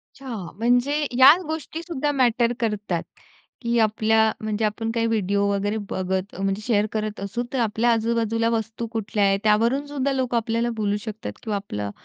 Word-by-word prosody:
अच्छा, 275 -1 -12 0.3
म्हणजे 245 +5 +2 0.2
ह्या 260 +5 +8
गोष्टीसुद्धा 315 -1 -3
मॅटर 240 -3 +2
करतात, 210 -7 -1 0.6
की 235 -1 0
आपल्या, 220 0 +3
म्हणजे 215 0 -1
आपण 225 +2 -2
काही 230 0 0
व्हिडिओ 200 -2 +1
वगैरे 205 +2 -1
बघत 190 +1 -2
म्हणजे 195 +1 -1
शेअर 210 -4 +2
करत 215 -1 -3
असू, 200 +5 -3
तर 265 - 0
आपल्या 230 +1 +2
आजूबाजूला 230 0 +1
वस्तू 225 0 -2
कुठल्या 215 -2 -1
आहेत, 195 0 +2
त्यावरूनसुद्धा 265 +6 +1
लोकं 255 -2 0
आपल्याला 230 +1 0
बोलू 205 0 +1
शकतात 220 -1 -5
किंवा 220 -3 -2
आपलं 105 - -4
225 Hz, 155 wpm, -23 LUFS, 210-240 Hz, 0.6 s, ह्या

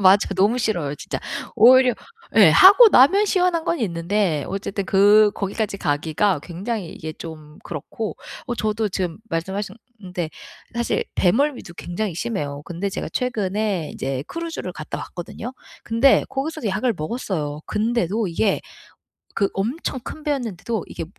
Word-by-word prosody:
맞아. 195 +1 +5
너무 205 +6 +3
싫어요 175 - -1
진짜. - - -5 0.4
오히려 255 +1 +7 0.4
예 - - +8
하고 405 +5 +9
나면 385 +8 +6
시원한 360 -4 +1
건 340 - 0
있는데 175 - 0
어쨌든 195 0 -3
그 205 +2 +5
거기까지 200 0 -2
가기가 160 +2 0
굉장히 190 +2 -4
이게 155 -1 -7
좀 155 -2 -10
그렇고. 175 +7 -5 0.3
어 240 - -2
저도 215 -1 -1
지금 185 -2 -3
말씀하셨는데 190 0 -5 0.4
사실 235 0 0
배멀미도 235 -1 +1
굉장히 180 +2 -4
심해요. 150 -8 -3
근데 175 +4 -3
제가 - - -4
최근에 210 - -1
인제 135 +1 -3
크루즈를 330 - -5
갔다 155 - -6
왔거든요. 210 +8 -7 0.3
근데 230 +4 +4
거기서도 275 -2 -3
약을 215 +5 0
먹었어요. 155 - -3
근데도 220 -1 0
이게 195 +4 +1 0.7
그 200 - +2
엄청 255 +6 -2
큰 305 +5 -8
배였는데도 235 - -2
이게, 165 - -5
205 Hz, 325 characters per minute, -22 LUFS, 175-235 Hz, 0.7 s, 하고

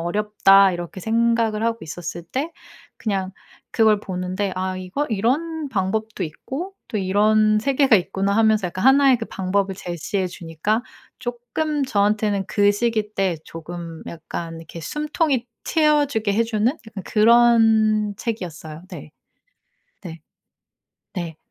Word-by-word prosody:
어렵다.' 195 +1 +4
이렇게 175 +1 -6
생각을 225 0 +1
하고 230 0 0
있었을 165 +2 -6
때 275 - -3 0.5
그냥 195 -3 -2 0.4
그걸 215 -2 +4
보는데 185 0 -3
'아 185 0 -2
이거 185 +11 -3
이런 290 +9 -1
방법도 215 +1 -2
있고 285 - -6
또 215 - -2
이런 215 +2 +3
세계가 270 -1 +4
있구나.' 195 +1 -1
하면서 220 -3 +3
약간 185 +4 -5
1 275 +1 +6
의 250 - +3
그 225 - -5
방법을 195 +1 -1
제시해 185 +1 -3
주니까 175 +6 -2 0.4
쪼끔 245 +5 -2
저한테는 205 -3 +1
그 205 0 +3
시기 215 -1 -1
때 190 -3 0
조금 165 0 -8
약간 165 0 -6
이렇게 165 +1 -10
숨통이 300 - -1 0.2
트여주게 290 -9 +2
해주는 225 -1 +1 0.2
약간 200 -4 -8
그런 220 -2 +4
책이었어요. 165 -8 -6
네. 155 -4 -9 0.9
네. 165 -4 -9 0.9
네. 170 -4 -5
210 Hz, 270 characters per minute, -22 LUFS, 185-230 Hz, 0.9 s, 1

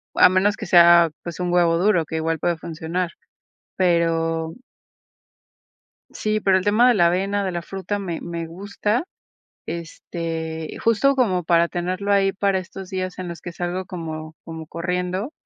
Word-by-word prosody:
a - - +7
menos 195 +3 +2
que - - -6
sea, 170 -2 +7
pues, 170 0 -7
un 180 -1 -1
huevo 170 -1 +3
duro, 180 -3 +3
que 160 - -6
igual 160 0 -1
puede 175 +1 0
funcionar. 165 +2 -3 0.6
Pero 165 -2 +1 1.6
sí, 215 0 -1
pero 195 -2 +4
el 185 - -4
tema 215 +4 +5
de 245 - +5
la 175 -5 +4
avena, 195 +3 0
de 190 - -2
la 175 -1 -3
fruta 195 +2 -4
me 175 -4 -4
me 170 -1 -5
gusta, 205 - -2 0.6
este, 165 -1 -5
justo 230 +5 +3
como 195 -10 +1
para 170 0 +3
tenerlo 185 +3 -2
ahí 195 -1 +3
para 195 -1 +1
estos 185 +1 -8
días 185 -1 -4
en 180 -1 -5
los 170 - -7
que 175 - -7
salgo 175 +2 -3
como 160 -4 -6
como 160 -1 -8
corriendo, 180 - -3
175 Hz, 165 wpm, -22 LUFS, 165-195 Hz, 1.6 s, a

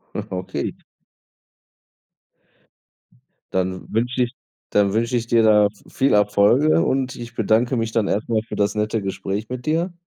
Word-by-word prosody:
Ah, - - -4
okay. 90 0 -4 2.8
Dann 95 0 -1
wünsche 125 +3 +1
ich 120 - -4 0.4
dann 100 -1 +2
wünsche 115 +3 0
ich 115 -1 -1
dir 115 -1 +3
da 105 -1 +5 0.2
viel 135 +1 +1
Erfolge 105 - +4
und 130 +5 0
ich 120 0 -9
bedanke 115 +4 +2
mich 115 -1 -1
dann 110 -3 +1
erst 105 +3 -1
mal 110 -2 +1
für - - -6
das 100 0 +1
nette 105 0 -1
Gespräch 95 +2 -3
mit 125 +3 -7
dir. 170 +3 0
110 Hz, 150 wpm, -21 LUFS, 105-125 Hz, 2.8 s, da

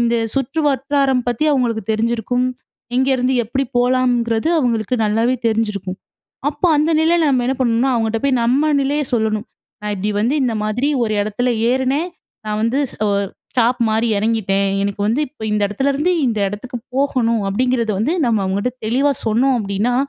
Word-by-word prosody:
இந்த 235 0 +2 0.2
சுற்று 275 +4 -1
வட்டாரம் 275 -1 +1
பத்தி 240 +5 0
அவங்களுக்கு 235 -5 0
தெரிஞ்சிருக்கும். 235 +3 0 0.5
எங்கிருந்து 260 0 +2
எப்படி 265 +5 -1
போலாம்ங்குறது 245 0 +1
அவங்களுக்கு 235 -3 0
நல்லாவே 225 +4 +1
தெரிஞ்சிருக்கும். 210 -4 -1 0.5
அப்போ 295 +4 -1
அந்த 305 +3 +2
நிலைல 330 +1 +3
நம்ம 255 -2 +2
என்ன 265 - +1
பண்ணனும்னா, 240 +2 +2
அவங்ககிட்ட 225 -1 0
போய் 265 -2 +2
நம்ம 275 +6 +2
நிலையை 290 +2 0
சொல்லணும். 220 -2 0 0.4
நான் 210 0 -3
இப்டி 205 +3 -2
வந்து 245 +7 +1
இந்த 240 -3 0
மாதிரி 225 +6 0
ஒரு 215 -2 0
இடத்துல 215 +5 -1 0.2
ஏறுனேன், 265 +6 0 0.4
நான் 215 0 -2
வந்து 230 +4 +1 0.3
ஒ - - +2 0.4
ஸ்டாப் 245 0 +2
மாறி 220 +2 +1
இறங்கிட்டேன். 200 -3 +1
எனக்கு 200 0 -3
வந்து 235 +7 +1
இப்ப 260 -4 -16
இந்த 210 -1 +1
இடத்துல 270 +7 0
இருந்து, 310 +7 +1
இந்த 225 -3 0
இடத்துக்குப் 235 +4 -7
போகணும் 240 -6 +1
அப்டிங்கறது 235 +1 0
வந்து 260 +10 +1
நம்ம 220 -3 +2
அவங்ககிட்ட 200 +6 -1
தெளிவா 275 +5 +2
சொன்னோம் 250 +4 +2
அப்டின்னா, 205 +4 -1
240 Hz, 160 wpm, -19 LUFS, 220-265 Hz, 0.5 s, நிலைல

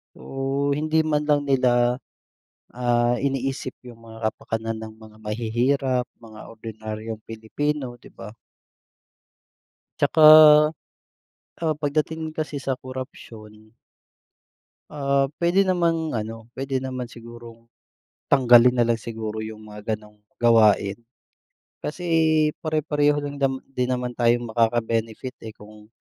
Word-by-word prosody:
Oh, 135 +1 -2
hindi 155 +2 +1
man 150 -1 +1
lang 145 -1 +1
nila, 125 -2 +3 0.8
ah, 120 0 +1
iniisip 135 -1 -2
yung 120 -2 -12
mga 110 -1 -3
kapakanan 115 0 -4
ng 110 0 -8
mga 110 -1 -16
mahihirap, 120 +4 0 0.2
mga 110 -1 -12 0.2
ordinaryong 110 0 -7
Pilipino, 120 +4 -4
di - - -15
ba? 105 - -11 1.7
Tsaka, 155 - +3 1.4
ah, 160 -2 0
pagdating 155 +2 -2
kasi 155 -2 -4
sa 130 -1 -1
korapsyon, 110 -4 -10 1.2
ah, 140 -1 +1 0.2
pwede 185 +3 +3
namang 165 -4 0
ano, 115 +1 -5
pwede 135 0 -3
naman 130 -2 -5
sigurong 115 0 -12 0.6
tanggalin 125 -2 +6
nalang 115 -1 +2
siguro 110 -1 -5
yung 110 0 -8
mga 105 +1 -4
ganung 105 0 -18 0.2
gawain. 110 -4 +4 0.9
Kasi 175 +4 -5 0.6
pare-pareho 150 -2 +1
rin 145 0 -5
dam 135 -1 0
din 125 -2 -2
naman 125 -1 -2
tayong 120 0 +2
makaka-benefit 115 +1 -1
eh 110 - -7
kung 105 0 -15
120 Hz, 110 wpm, -23 LUFS, 110-140 Hz, 1.7 s, tanggalin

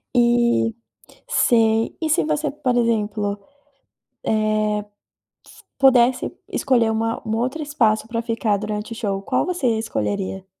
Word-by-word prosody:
E 235 -1 +3 0.5
sei. 225 -1 +2
E 315 - -1
se 315 - +3
você, 300 -1 -1
por 275 -4 -1
exemplo, 210 -3 0 0.9
eh, 215 -1 +1
s 205 - -12 0.9
pudesse 255 -2 +4 0.2
escolher 235 -4 +2
uma 225 +1 -1
um 220 - 0
outro 260 +7 -2
espaço 225 -7 +1
para 230 0 -2
ficar, 225 -3 0
durante 210 +1 -4
o - - -9
show, 200 -4 -2
qual - - 0
você 355 -7 -1
escolheria? 200 -3 -3
225 Hz, 130 wpm, -21 LUFS, 215-250 Hz, 0.9 s, pudesse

